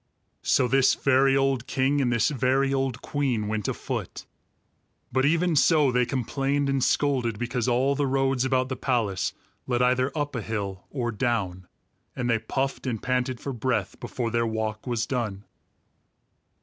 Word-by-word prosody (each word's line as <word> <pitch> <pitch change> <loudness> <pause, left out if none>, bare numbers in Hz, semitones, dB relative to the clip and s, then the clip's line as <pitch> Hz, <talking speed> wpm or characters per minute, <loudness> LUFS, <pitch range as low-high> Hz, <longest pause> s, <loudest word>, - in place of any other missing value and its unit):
So 125 - +3
this 135 +1 +4
very 135 0 +3
old 135 -3 +1
king 135 +2 +1
and 125 -2 +1
this 120 -2 +2
very 135 0 +1
old 135 -2 -1
queen 130 -7 -1
went 105 -1 -2
afoot; - - -4 0.9
but 130 +2 +2
even 165 +3 +2
so, 150 -2 +4
they 125 -1 +2
complained 135 +3 -1
and 135 -2 +1
scolded 125 -6 +1
because 120 +1 -2
all 130 +3 +2
the 140 0 0
roads 135 -1 +1
about 130 -1 +1
the 130 - -2
palace 115 -8 -1 0.3
led 125 -1 +1
either 130 +2 +2
up 145 -1 -2
a 120 - -2
hill 100 -3 -4
or 120 -4 -2
down, 105 -6 -2 0.5
and 125 - -2
they 115 -2 +2
puffed 135 +4 -2
and 115 -4 -3
panted 125 -1 -1
for 140 - -4
breath 130 +2 -2
before 120 -1 -3
their 115 0 +1
walk 110 +1 -3
was 120 -2 0
done. 110 -7 -3
125 Hz, 160 wpm, -26 LUFS, 115-135 Hz, 0.9 s, this